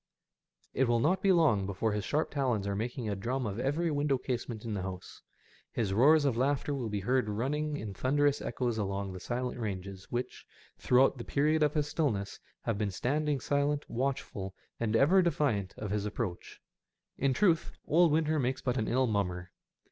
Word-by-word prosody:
It 135 Hz, -, +2 dB
will 120 Hz, 0 st, +3 dB
not 175 Hz, +9 st, +2 dB
be 195 Hz, -, +4 dB
long 150 Hz, -, +3 dB
before 100 Hz, +3 st, -1 dB
his 105 Hz, -1 st, -2 dB
sharp 155 Hz, +2 st, 0 dB
talons 125 Hz, -8 st, 0 dB
are 100 Hz, 0 st, -1 dB
making 120 Hz, +3 st, -3 dB
a 105 Hz, -, -1 dB
drum 125 Hz, +6 st, -2 dB
of 105 Hz, +1 st, -3 dB
every 150 Hz, +6 st, 0 dB
window 145 Hz, -2 st, +1 dB
casement 120 Hz, -3 st, -4 dB
in 110 Hz, -, -3 dB
the 100 Hz, -, -2 dB
house. 95 Hz, -1 st, -7 dB, 0.5 s
His 105 Hz, -5 st, -1 dB
roars 145 Hz, +7 st, +5 dB
of 135 Hz, -5 st, +2 dB
laughter 140 Hz, +3 st, 0 dB
will 125 Hz, -5 st, -3 dB
be 105 Hz, -1 st, -2 dB
heard 125 Hz, +1 st, +1 dB
running 145 Hz, +8 st, -1 dB
in 110 Hz, -5 st, -5 dB
thunderous 145 Hz, +6 st, +1 dB
echoes 120 Hz, -3 st, -2 dB
along 100 Hz, -1 st, -2 dB
those 95 Hz, -, -9 dB
silent 125 Hz, 0 st, -3 dB
ranges 95 Hz, -3 st, -5 dB
which, 120 Hz, +1 st, -4 dB, 0.4 s
throughout 130 Hz, +1 st, +3 dB
the -, -, -4 dB
period 155 Hz, +4 st, +1 dB
of 150 Hz, 0 st, +2 dB
his 150 Hz, -1 st, +2 dB
stillness, 125 Hz, -10 st, -1 dB, 0.2 s
have 110 Hz, -3 st, -1 dB
been 105 Hz, -2 st, 0 dB
standing 145 Hz, +8 st, 0 dB
silent, 145 Hz, +3 st, 0 dB
watchful, 115 Hz, -7 st, -3 dB, 0.2 s
and 115 Hz, -1 st, 0 dB
ever 160 Hz, +11 st, +5 dB
defiant 140 Hz, -, 0 dB
of 105 Hz, -2 st, -5 dB
his 105 Hz, 0 st, -1 dB
approach. 105 Hz, -4 st, -5 dB, 0.6 s
In 135 Hz, 0 st, +2 dB
truth, 165 Hz, +3 st, +2 dB
old 170 Hz, +1 st, +4 dB
winter 155 Hz, 0 st, +2 dB
makes 130 Hz, 0 st, -1 dB
but 125 Hz, 0 st, 0 dB
an 110 Hz, -, 0 dB
ill 130 Hz, +2 st, +2 dB
mummer. 90 Hz, -5 st, -2 dB
125 Hz, 185 wpm, -31 LUFS, 105-145 Hz, 0.6 s, roars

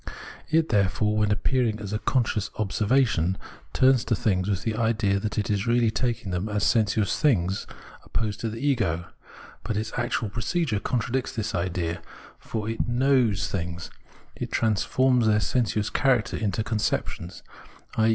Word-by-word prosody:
It, 160 Hz, 0 st, +2 dB
therefore, 105 Hz, +1 st, +2 dB
when 105 Hz, -1 st, +2 dB
appearing 115 Hz, +1 st, +1 dB
as 100 Hz, -1 st, -6 dB
conscious 110 Hz, -4 st, +1 dB
observation, 105 Hz, -3 st, +1 dB, 0.3 s
turns 130 Hz, -2 st, +4 dB
to 115 Hz, -, +1 dB
things 95 Hz, -2 st, 0 dB
with 95 Hz, -2 st, -1 dB
the 115 Hz, -, -1 dB
idea 110 Hz, -4 st, +1 dB
that 105 Hz, +1 st, -4 dB
it 105 Hz, 0 st, 0 dB
is 105 Hz, +3 st, 0 dB
really 115 Hz, -1 st, +3 dB
taking 115 Hz, -5 st, -2 dB
them 90 Hz, +4 st, -2 dB
as 105 Hz, -1 st, -1 dB
sensuous 105 Hz, -2 st, +2 dB
things 95 Hz, -, +1 dB, 0.4 s
opposed 105 Hz, -2 st, -2 dB
to 115 Hz, -, -2 dB
the 110 Hz, -, -6 dB
ego. 110 Hz, -, 0 dB, 0.6 s
But 105 Hz, -, -2 dB
its 110 Hz, +1 st, -3 dB
actual 120 Hz, -2 st, -1 dB
procedure 120 Hz, -, -1 dB
contradicts 125 Hz, +3 st, -1 dB
this 110 Hz, -1 st, -2 dB
idea, 85 Hz, -2 st, -2 dB, 0.4 s
for 110 Hz, -2 st, -4 dB
it 115 Hz, +1 st, -2 dB
knows 120 Hz, -5 st, +2 dB
things, 90 Hz, -2 st, -4 dB, 0.4 s
it -, -, -5 dB
transforms 120 Hz, +3 st, +2 dB
their 105 Hz, -1 st, +4 dB
sensuous 110 Hz, -2 st, 0 dB
character 125 Hz, -5 st, +2 dB
into 105 Hz, 0 st, -1 dB
conceptions, 105 Hz, -5 st, -2 dB, 0.5 s
i. 110 Hz, 0 st, +3 dB
110 Hz, 150 wpm, -26 LUFS, 100-120 Hz, 0.6 s, turns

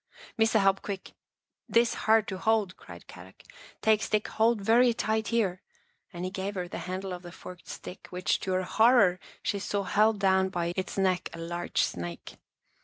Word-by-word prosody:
" -, -, -19 dB
Missa 225 Hz, 0 st, +4 dB
help 195 Hz, -1 st, +3 dB
quick. 195 Hz, -2 st, -6 dB, 0.6 s
This 235 Hz, 0 st, +3 dB
hard 220 Hz, -1 st, +3 dB
to 190 Hz, -2 st, -5 dB
hold," 215 Hz, -3 st, +1 dB
cried -, -, -13 dB
Kadok. -, -, -14 dB, 0.2 s
" -, -, -22 dB
Take 220 Hz, -1 st, +4 dB
stick, 215 Hz, -1 st, 0 dB
hold 225 Hz, 0 st, +2 dB
very 230 Hz, +4 st, +4 dB
tight 220 Hz, +1 st, -1 dB
here," 200 Hz, -6 st, 0 dB, 0.5 s
and 175 Hz, -1 st, -5 dB
he 185 Hz, -, -3 dB
gave 195 Hz, +1 st, -4 dB
her 180 Hz, -1 st, -3 dB
the -, -, -6 dB
handle 190 Hz, 0 st, -4 dB
of 180 Hz, -, -7 dB
the 175 Hz, -1 st, -10 dB
forked 180 Hz, 0 st, -11 dB
stick 180 Hz, -, -9 dB
which, 180 Hz, 0 st, 0 dB
to 190 Hz, -, -2 dB
her 185 Hz, 0 st, +1 dB
horror, 220 Hz, -2 st, +4 dB, 0.2 s
she 200 Hz, -, -1 dB
saw 200 Hz, 0 st, -2 dB
held 215 Hz, +2 st, +3 dB
down 190 Hz, -1 st, +3 dB
by 170 Hz, -1 st, -2 dB
its 190 Hz, +1 st, -4 dB
neck 185 Hz, -2 st, +1 dB
a -, -, -8 dB
large 175 Hz, +1 st, -1 dB
snake. 85 Hz, -1 st, -5 dB
195 Hz, 190 wpm, -28 LUFS, 180-220 Hz, 0.6 s, Missa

